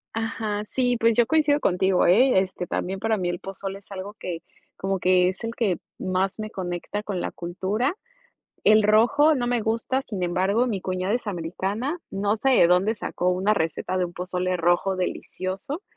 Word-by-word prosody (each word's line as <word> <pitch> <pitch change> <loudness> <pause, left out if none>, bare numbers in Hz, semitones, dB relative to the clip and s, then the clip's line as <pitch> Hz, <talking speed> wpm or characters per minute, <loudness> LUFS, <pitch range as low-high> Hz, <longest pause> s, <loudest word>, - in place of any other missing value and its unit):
Ajá, 220 -2 -2
sí, 245 -1 +1
pues, 230 -1 +3
yo 240 - +4
coincido 295 +1 +3
contigo, 190 -4 +2
¿eh?, 230 +4 +5
este, 185 -1 -3
también 190 +3 -3
para 220 +1 +1
mí, 180 -2 -1
el 175 0 -3
pozole 195 0 -6
es 200 - -25
algo 195 +1 -6
que 175 -5 -6 0.3
como 195 -1 -1
que 180 0 +4
es 185 +2 -7
el 230 0 -4
que 200 -8 0 0.2
más 190 +2 -1
me 215 0 -5
conecta 180 +2 -4
con 205 -3 -4
la - - -3
cultura. 195 - -2 0.7
El 215 0 +6
rojo 245 +9 +4
no 245 -4 -1
me 240 -1 +1
gusta, 230 +4 0
sin 205 -8 -5
embargo, 190 +7 +1
mi 210 -6 -2
cuñada 185 +2 -2
es 245 - -3
americana, 200 - -3
no 205 +2 0
sé 270 - +2
de 250 - +6
dónde 185 +5 +3
sacó 180 -3 -2
una 185 +3 +2
receta 170 +1 -1
de 180 - +2
un 175 - -11
pozole 180 0 -2
rojo 175 +3 +2
delicioso, 185 - -4
195 Hz, 190 wpm, -25 LUFS, 185-225 Hz, 0.7 s, El